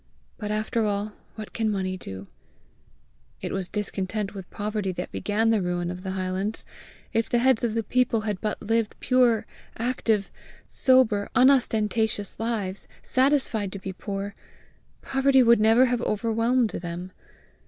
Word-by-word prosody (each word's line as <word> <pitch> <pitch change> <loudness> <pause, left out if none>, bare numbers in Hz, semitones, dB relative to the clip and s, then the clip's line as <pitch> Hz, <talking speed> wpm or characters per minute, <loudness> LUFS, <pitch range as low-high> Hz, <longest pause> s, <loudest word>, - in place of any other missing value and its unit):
but 210 - -4
after 215 +2 0
all, 205 +1 -2 0.2
what 215 -2 -8
can 220 -1 0
money 190 -2 -1
do? 95 - -8 1.1
It - - -4
was 190 -2 -3
discontent 205 0 -3
with 190 -3 -8
poverty 210 -2 -2
that 180 +1 -5
began 220 +2 +1
the 220 -3 +2
ruin 175 -1 -1
of 180 0 -7
the 190 - -5
highlands! 190 +3 -2 0.5
If 225 0 +1
the 240 - +2
heads 250 -1 +3
of 230 -2 0
the 225 - 0
people 240 0 +1
had 210 -4 -3
but 215 - -2
lived 225 -1 0
pure, 250 -3 +3 0.3
active, 225 -4 0 0.4
sober, 245 -6 +3
unostentatious 225 -5 +2
lives, 215 -4 -3 0.2
satisfied 255 -7 +1
to - - -5
be 190 0 -6
poor, 200 +1 -5 0.7
poverty 270 -1 +4
would 235 -1 +6
never 225 +4 +5
have 245 -1 0
overwhelmed 230 +2 +1
them! 175 +1 -5
215 Hz, 145 wpm, -26 LUFS, 195-235 Hz, 1.1 s, would